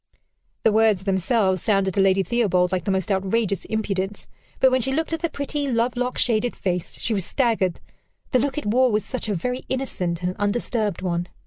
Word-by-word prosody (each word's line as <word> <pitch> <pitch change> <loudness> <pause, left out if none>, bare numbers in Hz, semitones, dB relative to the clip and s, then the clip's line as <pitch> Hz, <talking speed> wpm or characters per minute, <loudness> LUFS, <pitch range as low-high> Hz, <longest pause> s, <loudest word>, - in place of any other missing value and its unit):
The 225 - +5
words 215 -3 +3
themselves 190 0 +1
sounded 195 -3 +1
to 195 - +2
Lady 195 0 +4
Theobald 185 -6 +1
like 180 -2 -1
the - - -1
most 190 +2 0
outrageous 195 +1 0
impudence; 205 -2 -2 0.3
but 260 - +5
when 260 0 +2
she 265 - -1
looked 320 +4 -1
at 325 - -1
the 335 - -1
pretty, 285 0 -3
lovelock 245 +2 0
shaded 240 0 +1
face, 180 -2 -2
she 230 - 0
was 195 -3 -1
staggered 210 -5 0 0.5
the 255 - +4
look 275 +2 -1
it 300 - -3
wore 250 +4 +3
was 210 0 0
such 255 -4 -4
a 205 - 0
very 250 +8 -3
innocent 180 -10 -2
and 180 +1 -1
undisturbed 205 -2 -1
one. 175 -1 -1
210 Hz, 195 wpm, -23 LUFS, 190-250 Hz, 0.5 s, The